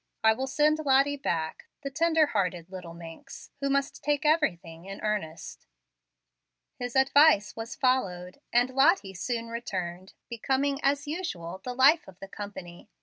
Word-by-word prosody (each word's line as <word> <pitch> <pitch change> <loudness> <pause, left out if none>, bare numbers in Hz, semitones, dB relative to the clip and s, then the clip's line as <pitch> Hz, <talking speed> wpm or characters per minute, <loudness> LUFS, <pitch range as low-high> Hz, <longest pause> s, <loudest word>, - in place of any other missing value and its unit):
I 220 0 +6
will 265 +4 -3
send 300 +3 +2
Lottie 280 -1 +3
back, 165 - -3 0.2
the 275 - -4
tender 320 +2 +3
hearted 180 - -2
little 180 -3 -8
minx, 165 -1 -11
who 280 0 -1
must 275 0 -1
take 295 +1 0
everything 175 - 0
in 195 0 -8
earnest." 205 -7 -4 1.1
His 245 0 -5
advice 265 -5 +5
was 225 +2 -6
followed, 195 -7 -1
and 245 +2 +3
Lottie 270 - +3
soon 230 +5 -3
returned, 185 -6 -5
becoming, 270 +4 -1
as 285 +1 +1
usual, 190 - -5
the 250 -1 -5
life 280 +6 +5
of 185 -1 -14
the 195 - -8
company. 190 -4 -9
240 Hz, 145 wpm, -28 LUFS, 185-280 Hz, 1.1 s, I